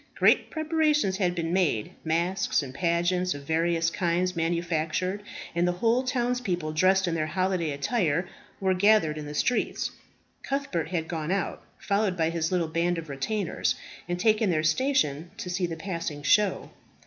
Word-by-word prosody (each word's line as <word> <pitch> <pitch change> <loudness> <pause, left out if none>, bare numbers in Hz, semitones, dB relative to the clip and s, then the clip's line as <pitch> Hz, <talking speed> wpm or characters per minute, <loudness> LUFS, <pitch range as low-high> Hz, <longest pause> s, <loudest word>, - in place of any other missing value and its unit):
Great - - +4
preparations 310 - +1
had 180 -3 +1
been 165 -1 -2
made; 160 - +1
masques 170 +1 +1
and 130 -2 -8
pageants 175 +3 +1
of 140 - -8
various 165 +2 +1
kinds 180 0 0
manufactured; 170 +3 -1 0.3
and 170 +1 +2
the 180 - +1
whole 230 +7 +2
townspeople, 245 -10 -1
dressed 185 +4 +3
in 170 - 0
their 155 -2 -1
holiday 185 -2 0
attire, 160 - 0 0.3
were 190 -1 +2
gathered 185 -5 +4
in 150 -1 -6
the 150 - -6
streets. 245 +10 0 0.5
Cuthbert 275 - -2
had 165 -3 -2
gone 160 -2 -3
out, 195 0 -1 0.2
followed 200 -1 0
by 165 0 +1
his 165 0 -1
little 175 -3 +1
band 170 +2 0
of 160 -2 -6
retainers, 185 +8 -1 0.3
and 175 0 -1
taken 215 0 +3
their 155 -3 +1
station 160 - +1
to 190 -6 -5
see 180 0 0
the 165 - -4
passing 165 -4 -4
show. 210 +6 +2
175 Hz, 160 wpm, -27 LUFS, 160-195 Hz, 0.5 s, Great